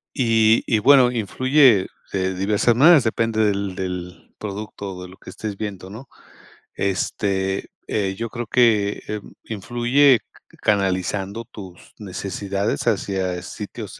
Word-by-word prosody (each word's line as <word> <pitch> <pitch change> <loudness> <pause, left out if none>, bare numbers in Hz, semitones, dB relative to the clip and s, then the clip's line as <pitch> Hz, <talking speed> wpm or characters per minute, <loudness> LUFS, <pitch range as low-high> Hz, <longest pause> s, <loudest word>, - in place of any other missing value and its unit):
Y 115 -4 +3
y 110 - +3
bueno, 130 +1 +6
influye 125 0 +3 0.2
de 95 -1 -1
diversas 105 +5 +2
maneras, 150 +2 +7
depende 110 -1 0
del 100 -2 -1
del 90 -2 -6
producto 100 -1 -6
o 90 - -9
de 90 - -10
lo 95 - -15
que - - -12
estés 105 -2 -6
viendo, 100 -3 -6
¿no? 115 +7 -10 0.7
Este, 95 0 -1 0.2
eh, 95 -2 -1
yo 115 0 -4
creo 120 +1 -5
que, 110 -5 +2
eh, 105 0 -3
mm, - - -14
influye 120 +4 +3 0.3
c - - -20
canalizando 100 +2 -1
tus 95 -5 -13
necesidades 100 +1 -3
hacia 95 -4 -1
sitios - - -8
105 Hz, 135 wpm, -22 LUFS, 95-115 Hz, 0.7 s, maneras